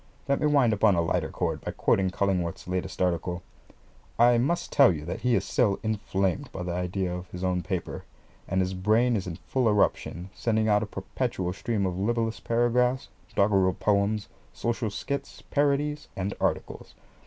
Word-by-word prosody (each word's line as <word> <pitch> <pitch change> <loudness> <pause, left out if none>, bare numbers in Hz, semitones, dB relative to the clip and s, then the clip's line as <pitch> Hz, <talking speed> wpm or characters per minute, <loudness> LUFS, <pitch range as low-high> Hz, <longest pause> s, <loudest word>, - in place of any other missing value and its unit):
Let 140 0 +1
me 150 - +3
wind 140 -6 +4
up 105 - -4
on 105 -3 +6
a 85 - +2
lighter 85 - 0
chord - - -2
by - - -5
quoting 95 -1 +2
Cullingworth's 90 -3 -1
latest 95 0 -2
article. 90 0 -1 0.7
I 120 0 +5
must 155 +8 0
tell 140 -6 +6
you 75 -3 -5
that 85 - -4
he 125 +1 +2
is - - 0
still 105 -5 +1
inflamed 105 +3 -1
by 90 - -5
the 90 - -3
idea 90 +1 -2
of 90 +1 -6
his 90 +1 -7
own 90 -1 +1
paper, 90 0 -4 0.4
and 95 - +1
his 95 +1 -1
brain 110 +6 +2
is 95 -3 -2
in 85 - -4
full 125 +6 0
eruption, 95 -3 0
sending 110 -1 0
out 105 -1 +4
a 110 - -3
perpetual 95 -2 -3
stream 100 0 -1
of 90 -1 -2
libellous 115 +1 0
paragraphs, 125 +2 +1 0.3
doggerel 100 -2 +3
poems, 105 +1 +1 0.3
social 115 -1 -1
skits, 140 +7 -5
parodies, 145 +1 +1
and 95 +1 -2
articles. - - -2
100 Hz, 175 wpm, -27 LUFS, 95-120 Hz, 0.7 s, on